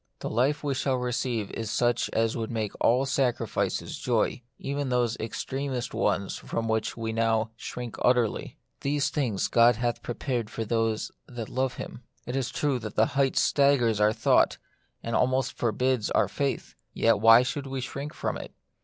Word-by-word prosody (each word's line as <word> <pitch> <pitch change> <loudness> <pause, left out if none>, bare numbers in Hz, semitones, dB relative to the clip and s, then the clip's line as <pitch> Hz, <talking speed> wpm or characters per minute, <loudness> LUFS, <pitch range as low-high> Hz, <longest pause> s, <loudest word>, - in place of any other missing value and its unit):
The - - -5
life 130 +7 +1
we 145 -2 0
shall 135 0 0
receive 125 -3 -2
is 115 -2 -4
such 120 +1 +1
as 115 0 +1
would 115 -2 -3
make 110 -3 -2
all 125 +4 +4
sacrifices 135 -3 -1
joy, - - 0 0.2
even 140 0 -3
those 120 -2 +1
extremest 130 +3 -3
ones 100 -1 0
from 115 0 -3
which 110 0 -1
now 115 0 +1
we 115 - -13
shrink 120 +1 -6
most - - -4
utterly. 125 -3 0 0.2
These 145 +1 0
things 125 -10 0
God 120 0 +5
hath 120 +1 -1
prepared 120 -2 -3
for 115 0 -4
them 115 -1 +1 0.3
that 120 -3 -6
love 130 -1 -1
Him. - - -7 0.2
It 125 - -4
is 135 -2 -1
true 140 -4 0
the 110 0 +1
height 135 +1 +1
staggers 125 -7 +3
our 105 0 +5
thought, - - +3 0.5
and 115 - -2
almost 130 0 +1
forbids 125 0 0
our - - +2
faith. 140 -1 -2 0.2
Yet 115 -2 +3
why 115 +3 +8
should 135 +3 -3
we 135 0 -3
shrink 140 +3 -5
from - - -2
it - - -10
120 Hz, 170 wpm, -27 LUFS, 115-135 Hz, 0.5 s, why